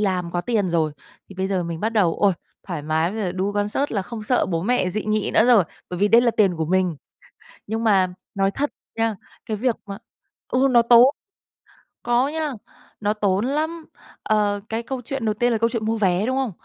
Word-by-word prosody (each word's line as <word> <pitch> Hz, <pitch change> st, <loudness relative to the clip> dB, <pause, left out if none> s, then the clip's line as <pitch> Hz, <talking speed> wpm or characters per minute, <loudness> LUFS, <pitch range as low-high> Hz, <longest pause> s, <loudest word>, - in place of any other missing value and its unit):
làm 185 Hz, -4 st, -1 dB
có 175 Hz, -, -1 dB
tiền 210 Hz, -1 st, 0 dB
rồi 160 Hz, -3 st, +1 dB, 0.4 s
thì 195 Hz, -, -12 dB
bây 190 Hz, +1 st, -2 dB
giờ 190 Hz, -2 st, 0 dB
mình 165 Hz, -1 st, -5 dB
bắt 220 Hz, -, +1 dB
đầu, 195 Hz, -7 st, +2 dB
ôi, 200 Hz, -2 st, +4 dB, 0.3 s
thoải 170 Hz, -6 st, -5 dB
mái! 160 Hz, +3 st, 0 dB
Bây 220 Hz, +2 st, -5 dB
giờ 185 Hz, -4 st, -1 dB
đu 190 Hz, +2 st, -2 dB
concert 205 Hz, +7 st, -1 dB
là 200 Hz, -4 st, 0 dB
không 220 Hz, +3 st, -7 dB
sợ 245 Hz, +4 st, +1 dB
bố 165 Hz, -3 st, -2 dB
mẹ 220 Hz, -3 st, +1 dB
dị 215 Hz, +3 st, -2 dB
nghị 215 Hz, -1 st, 0 dB
nữa 220 Hz, -, +6 dB
rồi, 230 Hz, -8 st, +6 dB, 0.3 s
bởi 180 Hz, -, -4 dB
vì 205 Hz, +2 st, +3 dB
đây 230 Hz, +3 st, +6 dB
là 240 Hz, -1 st, +3 dB
tiền 195 Hz, -6 st, +2 dB
của 160 Hz, -, -1 dB
mình. 180 Hz, 0 st, +1 dB, 0.7 s
Nhưng 225 Hz, +2 st, -2 dB
mà 195 Hz, -4 st, +4 dB, 0.3 s
nói 195 Hz, 0 st, +1 dB
thật 290 Hz, +7 st, -1 dB, 0.3 s
nha, 225 Hz, -1 st, 0 dB, 0.3 s
cái 220 Hz, -3 st, -3 dB
việc 240 Hz, +1 st, +1 dB
mà 200 Hz, -1 st, -7 dB, 0.5 s
ừ, 260 Hz, +2 st, +2 dB
nó 240 Hz, -1 st, +6 dB
tốn! 235 Hz, +1 st, +7 dB, 1.0 s
Có 240 Hz, +2 st, +2 dB
nha, 305 Hz, -1 st, -2 dB, 0.5 s
nó 210 Hz, 0 st, 0 dB
tốn 205 Hz, 0 st, 0 dB
lắm! 310 Hz, +4 st, -2 dB, 0.4 s
Ờ, 205 Hz, -1 st, +1 dB
cái 225 Hz, +1 st, -2 dB
câu 260 Hz, +2 st, -5 dB
chuyện 255 Hz, 0 st, -4 dB
đầu 215 Hz, -, +1 dB
tiên 240 Hz, +3 st, +1 dB
là 230 Hz, -, +1 dB
câu 230 Hz, +1 st, +1 dB
chuyện 230 Hz, -2 st, -3 dB
mua 225 Hz, +1 st, 0 dB
vé, 190 Hz, -1 st, +1 dB
đúng 260 Hz, +2 st, 0 dB
không? 265 Hz, -4 st, -1 dB
210 Hz, 225 wpm, -22 LUFS, 190-235 Hz, 1.0 s, tốn